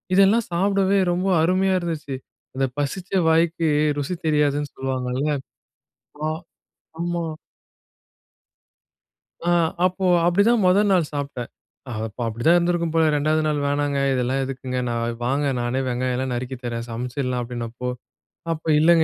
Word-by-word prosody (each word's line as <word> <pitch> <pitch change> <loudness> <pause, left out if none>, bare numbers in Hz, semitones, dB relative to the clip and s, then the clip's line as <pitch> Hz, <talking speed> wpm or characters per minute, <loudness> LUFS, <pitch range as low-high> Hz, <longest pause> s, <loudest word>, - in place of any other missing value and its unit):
இதெல்லாம் 200 +4 +4
சாப்டவே 195 +2 +2
ரொம்ப 180 +2 0 0.2
அருமையா 185 +2 +2
இருந்துச்சு. 155 -5 -4 0.4
அந்த 135 - +1
பசிச்ச 160 +6 -3 0.2
வாய்க்கு 165 0 +2 0.3
ருசி 145 +6 -2
தெரியாதுன்னு 145 -1 +1
சொல்லுவாங்கல்ல. 130 +1 -2 1.0
ஆ - - +1 0.7
ஆமா. 175 0 -1 2.2
ஆ. 175 - +2 0.4
அப்போ 185 +1 -1 0.2
அப்டிதான் 205 +6 +4
மொத 185 +3 +5
நாள் 170 -5 +2
சாப்ட்டேன். 140 -4 -4 0.4
அது 110 -2 -3
அப்ப 110 - -12
அப்படிதான் 120 +10 +3
இருந்திருக்கும் 170 -2 +1
போல, 165 - +4
2 155 +2 +2
நாள் 150 -1 +1
வேணாங்க. 145 0 0
இதெல்லாம் 130 +1 0
எதுக்குங்க? 130 -1 -4
நான், 115 0 -2
வாங்க 140 +4 +1
நானே 120 +2 -1
வெங்காயம் 125 +1 -1
எல்லாம் 130 0 -2
நறுக்கித் 125 +1 -5
தரேன், 115 -1 -3
சமைச்சிடலாம் 125 +2 -2
அப்டின்னப்போ, 120 0 -5 0.6
அப்போ 165 0 -4
இல்லைங்க. 165 +1 +5
145 Hz, 125 wpm, -23 LUFS, 125-175 Hz, 2.2 s, மொத